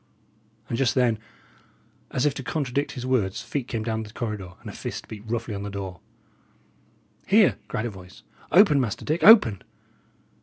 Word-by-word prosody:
And 115 - -3
just 130 -3 +2
then, 120 -4 +2 0.9
as 130 - -1
if 145 - +2
to 135 - -6
contradict 140 +1 -2
his 125 -1 -6
words, 115 -7 0
feet 135 -4 -4
came 115 -3 -3
down 110 0 -2
the 105 -1 -9
corridor, 105 -6 -5
and - - -12
a - - -6
fist - - -6
beat 105 -2 -9
roughly 115 -1 -3
on 100 - -4
the 100 - -5
door. 95 -3 -6 1.3
"Here!" - - +4
cried 110 - -3
a 120 - -3
voice. 95 -1 -14 0.3
"Open, 175 -7 +6
Master 115 -5 -3
Dick; 155 +3 -1
open!" 160 - +7
115 Hz, 175 wpm, -25 LUFS, 105-130 Hz, 1.3 s, open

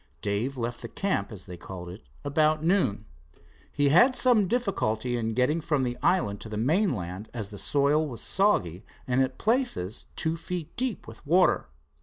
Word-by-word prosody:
Dave 105 +7 -1
left 120 0 -3
the - - -6
camp, 190 - -2
as 100 -4 -8
they 90 -2 -9
called 90 +1 -8
it, 90 +5 -9 0.2
about 155 +2 +2
noon. 165 - +1 0.7
He 145 0 +2
had 240 - +6
some 235 -6 +4
difficulty 130 - 0
in 115 -2 -2
getting 150 +7 +2
from 150 -4 0
the 120 -1 -1
island 170 - +1
to 110 - -8
the 105 - -4
mainland, 110 - 0
as 110 -3 -4
the 100 - -7
soil 145 +8 +2
was 120 -5 -7
soggy 100 - +1 0.2
and 130 +1 +2
at 130 0 -1
places 225 - 0
two 160 +1 -1
feet 170 -1 -6
deep 245 -5 -3
with 110 0 -12
water. 175 +5 +3
135 Hz, 175 wpm, -27 LUFS, 110-175 Hz, 0.7 s, had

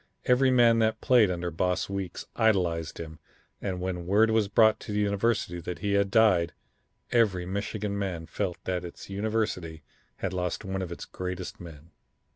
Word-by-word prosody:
Every 130 +1 +4
man 120 -2 +5
that 110 0 +1
played 120 -6 +5
under 90 -1 -2
Boss 90 +3 0
Weeks 100 -3 -5
idolized 90 -8 +1
him, 80 -1 -8 0.4
and 95 -3 -3
when 90 -1 -4
word 110 +4 +4
was 110 -2 +2
brought 110 +1 +4
to - - -8
the 105 - -1
university 100 -3 0
that 85 0 -5
he 100 +4 -1
had 100 0 +2
died, 95 -6 +4 0.6
every 100 -7 +2
Michigan 100 +2 -3
man 95 -5 -3
felt 90 0 -3
that 90 -1 -2
its 90 +2 -9
university 100 -6 -2 0.3
had 95 - -3
lost 90 +2 -2
one 95 0 -3
of 90 -2 -5
its 85 - -6
greatest 90 0 -6
men. 80 -2 -12
95 Hz, 170 wpm, -28 LUFS, 90-110 Hz, 0.6 s, man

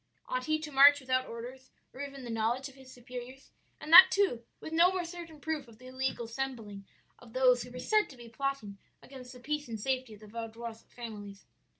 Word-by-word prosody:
"'Ought - - -2
he 310 0 +1
to 310 -1 -7
march 285 +1 +8
without 255 -1 0
orders 250 +3 -9 0.2
or 265 - -8
even 275 -1 -7
the 240 - -6
knowledge 230 +4 -1
of 270 - -14
his 265 -1 -15
superiors? 250 +2 -10 0.3
and 310 - -4
that 370 +2 +13
too 370 -12 +1 0.2
with 315 - -8
no 340 +3 +5
more 370 -2 -2
certain 335 -2 -9
proof 300 -3 -3
of 225 -2 -16
the 255 - -16
illegal 260 -2 -3
assembling 225 -5 -5 0.3
of 235 -2 -16
those 255 -1 +4
who 245 - -8
were 250 - -9
said 425 +12 +2
to 265 - -13
be 240 -1 -11
plotting 230 -4 -4 0.2
against 260 -2 -11
the 250 - -12
peace 295 +2 -3
and 225 -2 -5
safety 255 -1 -2
of 210 - -19
the 215 - -12
Vaudois 225 +1 -7
families?' 205 -4 -9
255 Hz, 215 wpm, -31 LUFS, 230-285 Hz, 0.3 s, that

